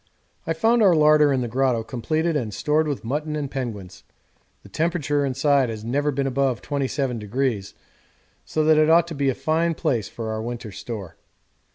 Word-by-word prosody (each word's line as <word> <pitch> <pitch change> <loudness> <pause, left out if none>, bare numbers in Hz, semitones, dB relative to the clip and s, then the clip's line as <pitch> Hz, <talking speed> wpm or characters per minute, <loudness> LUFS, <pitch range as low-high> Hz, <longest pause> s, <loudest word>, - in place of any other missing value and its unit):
I 165 - +1
found 225 +8 +2
our 190 -5 +5
larder 150 -1 +5
in 130 -2 +1
the 120 - -2
grotto 125 -1 +1
completed 155 +8 -1
and 120 -7 -2
stored 155 +1 +1
with 145 -5 -3
mutton 150 +6 -2
and 145 -3 -4
penguins 110 -9 -6 0.6
the - - -13
temperature 155 -3 0
inside 135 -1 +2
has 110 -1 -6
never 145 +5 0
been 140 -1 -1
above 135 -2 0
27°, 130 -6 -2 0.7
so 155 - -1
that 155 0 +5
it 155 0 +4
ought 170 +1 +5
to - - -5
be 140 -2 0
a 130 - -1
fine 165 +1 0
place 115 -10 -1
for 110 -1 -5
our 110 0 -3
winter 120 -1 -6
store. 100 -2 -7
140 Hz, 180 wpm, -23 LUFS, 120-155 Hz, 0.7 s, our